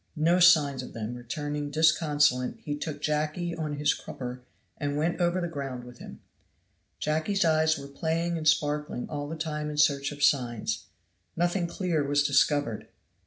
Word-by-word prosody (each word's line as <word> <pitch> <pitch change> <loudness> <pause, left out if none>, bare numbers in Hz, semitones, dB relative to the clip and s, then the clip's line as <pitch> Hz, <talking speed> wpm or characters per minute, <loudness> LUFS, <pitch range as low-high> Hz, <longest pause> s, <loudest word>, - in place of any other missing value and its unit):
No 170 +3 +3
signs 150 -7 +5
of 125 - -9
them 115 +1 -4
returning 145 +4 -4
disconsolate 150 -4 +2
he 145 - -3
took 145 0 -6
Jacky 155 +3 -1
on 155 -3 -3
his 145 +1 +2
crupper 125 -1 -7 0.4
and 145 -1 -2
went 165 +4 0
over 175 +1 +2
the 175 - -1
ground 135 -6 -5
with 125 0 -13
him. - - -11 0.8
Jacky's 160 +6 0
eyes 155 -1 +3
were 140 0 -8
playing 165 +4 -1
and 155 -1 -2
sparkling 150 -3 +1
all 145 -1 -4
the 160 - -4
time 150 -1 -3
in 150 - -6
search 145 -1 +3
of 145 0 -5
signs. 120 - +1 0.5
Nothing 175 +1 +1
clear 170 -3 -1
was 145 +1 +2
discovered. 140 -6 +1
150 Hz, 165 wpm, -28 LUFS, 140-160 Hz, 0.8 s, signs